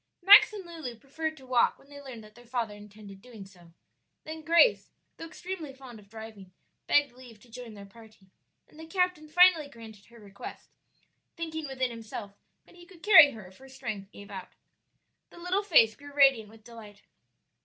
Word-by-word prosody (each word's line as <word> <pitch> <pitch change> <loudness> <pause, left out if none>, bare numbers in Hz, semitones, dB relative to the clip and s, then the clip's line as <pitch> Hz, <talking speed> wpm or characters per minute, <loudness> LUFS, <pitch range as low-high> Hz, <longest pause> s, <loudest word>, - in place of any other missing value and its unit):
Max 405 +3 +8
and 405 -3 -9
Lulu 320 -8 -8
preferred 315 +6 -6
to 265 - -15
walk 250 -2 +2
when - - -23
they 285 0 -12
learned 255 -5 -10
that 215 0 -16
their 240 +1 -18
father 235 -3 -3
intended 205 -1 -14
doing 225 -5 -12
so; 175 -3 -19 0.5
then 315 +1 -8
Grace, 335 +10 +3 0.3
though 330 - -8
extremely 325 -4 -8
fond 255 -4 -13
of 200 -1 -20
driving, 220 -4 -11 0.4
begged 290 -2 +3
leave 245 -3 -15
to 235 +2 -21
join 235 -2 -10
their 200 -1 -11
party, 215 -2 -19 0.4
and 305 - -19
the 320 - -10
captain 360 -3 -1
finally 335 -2 +4
granted 220 -5 -14
her 235 0 -18
request, 200 -2 -11 0.7
thinking 320 -2 -5
within 260 -2 -3
himself 225 -3 -9 0.3
that - - -21
he 350 0 -17
could 360 -4 -19
carry 355 -9 +8
her 215 -4 -11
if 185 +1 -17
her 265 0 -16
strength 215 -7 -7
gave 205 0 -13
out. 190 -2 -9 0.8
The - - -17
little 360 +3 -1
face 265 - +4
grew 285 +3 -13
radiant 270 -7 +3
with 220 0 -18
delight. 220 -3 -14
250 Hz, 185 wpm, -28 LUFS, 215-315 Hz, 0.8 s, Max